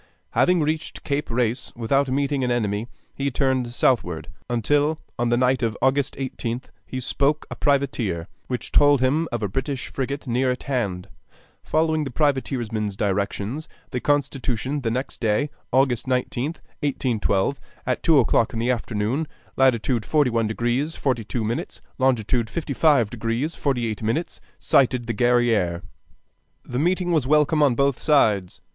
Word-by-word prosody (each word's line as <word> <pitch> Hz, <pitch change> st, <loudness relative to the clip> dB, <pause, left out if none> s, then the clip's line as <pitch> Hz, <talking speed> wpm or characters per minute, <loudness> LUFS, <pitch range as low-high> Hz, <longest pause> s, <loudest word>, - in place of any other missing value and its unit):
Having 180 Hz, -2 st, +3 dB
reached 155 Hz, +1 st, -2 dB
Cape 145 Hz, +1 st, -2 dB
Race 120 Hz, +1 st, -1 dB
without 135 Hz, +4 st, +1 dB
meeting 140 Hz, 0 st, 0 dB
an 125 Hz, -, 0 dB
enemy, 110 Hz, -2 st, 0 dB, 0.3 s
he 140 Hz, 0 st, -1 dB
turned 130 Hz, -2 st, 0 dB
southward, 100 Hz, -9 st, +1 dB, 0.2 s
until 145 Hz, +6 st, +1 dB, 0.2 s
on 120 Hz, 0 st, +1 dB
the 120 Hz, -, +3 dB
night 130 Hz, +1 st, +2 dB
of 115 Hz, -3 st, -1 dB
August 135 Hz, +1 st, +1 dB
18th 125 Hz, -2 st, -4 dB, 0.2 s
he 130 Hz, -, -4 dB
spoke 140 Hz, +4 st, 0 dB
a -, -, -4 dB
privateer, 120 Hz, -, 0 dB, 0.2 s
which 125 Hz, -1 st, -4 dB
told 145 Hz, -1 st, +5 dB
him 145 Hz, +6 st, +2 dB
of 120 Hz, -2 st, -2 dB
a -, -, +1 dB
British 130 Hz, +6 st, -3 dB
frigate 140 Hz, +2 st, -3 dB
near 125 Hz, +1 st, +1 dB
at 125 Hz, -, -2 dB
hand. 100 Hz, -10 st, -2 dB, 0.5 s
Following 155 Hz, 0 st, +1 dB
the 140 Hz, -, -4 dB
privateersman's 120 Hz, -7 st, -1 dB
directions, 100 Hz, +8 st, -2 dB, 0.2 s
the 125 Hz, -, -1 dB
Constitution 135 Hz, -2 st, -1 dB
the 115 Hz, -, -1 dB
next 125 Hz, +4 st, -3 dB
day, 115 Hz, +6 st, +1 dB, 0.2 s
August 130 Hz, -2 st, +2 dB
19th, 130 Hz, +4 st, -1 dB, 0.2 s
[1812,] 130 Hz, -4 st, 0 dB, 0.2 s
at 125 Hz, -1 st, -1 dB
two 160 Hz, -3 st, +4 dB
o'clock 115 Hz, -2 st, +3 dB
in -, -, -4 dB
the 120 Hz, +3 st, +1 dB
afternoon, 115 Hz, +5 st, -1 dB, 0.3 s
latitude 125 Hz, -2 st, +2 dB
41 120 Hz, -7 st, +2 dB
deg. 120 Hz, +7 st, 0 dB
42 120 Hz, -3 st, -1 dB
min., 115 Hz, +3 st, -1 dB, 0.4 s
longitude 120 Hz, -3 st, +1 dB
55 140 Hz, -5 st, +2 dB
deg. 115 Hz, +6 st, -2 dB
48 120 Hz, -9 st, -1 dB
min., 115 Hz, +11 st, 0 dB, 0.3 s
sighted 125 Hz, -3 st, +2 dB
the 115 Hz, -, -2 dB
Guerrière. 115 Hz, -7 st, +2 dB, 0.8 s
The 125 Hz, -, -3 dB
meeting 175 Hz, +3 st, +1 dB
was 155 Hz, -6 st, +2 dB
welcome 150 Hz, +1 st, +3 dB
on 140 Hz, -5 st, +4 dB
both 140 Hz, 0 st, +1 dB
sides. 105 Hz, -, +2 dB
125 Hz, 145 wpm, -23 LUFS, 115-140 Hz, 0.8 s, told